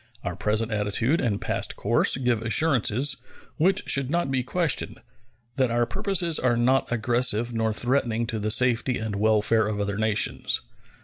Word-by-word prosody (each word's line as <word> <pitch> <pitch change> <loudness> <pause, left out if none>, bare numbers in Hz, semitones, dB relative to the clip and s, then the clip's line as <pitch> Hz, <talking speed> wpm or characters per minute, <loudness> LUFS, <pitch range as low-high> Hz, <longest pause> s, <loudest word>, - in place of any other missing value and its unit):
Our - - -4
present 110 +2 -1
attitude 110 +8 0
and 105 -4 -1
past - - -2
course - - +2
give 125 -4 0
assurances, 130 +1 +2 0.4
which 185 +5 +2
should 135 -2 +1
not 170 -3 -1
be 130 -1 0
questioned, 160 +4 -1 0.6
that 130 -2 +2
our 120 +1 +1
purposes 170 - -1
are 120 -2 +1
not 130 +3 +1
aggressive 120 0 0
nor 115 -1 0
threatening 120 0 -1
to 115 -1 -4
the 105 +1 -2
safety 125 +2 +1
and 110 -2 -4
welfare 110 +1 +2
of 105 -1 -3
other 100 0 -2
nations. 110 -1 0
120 Hz, 160 wpm, -25 LUFS, 110-130 Hz, 0.6 s, course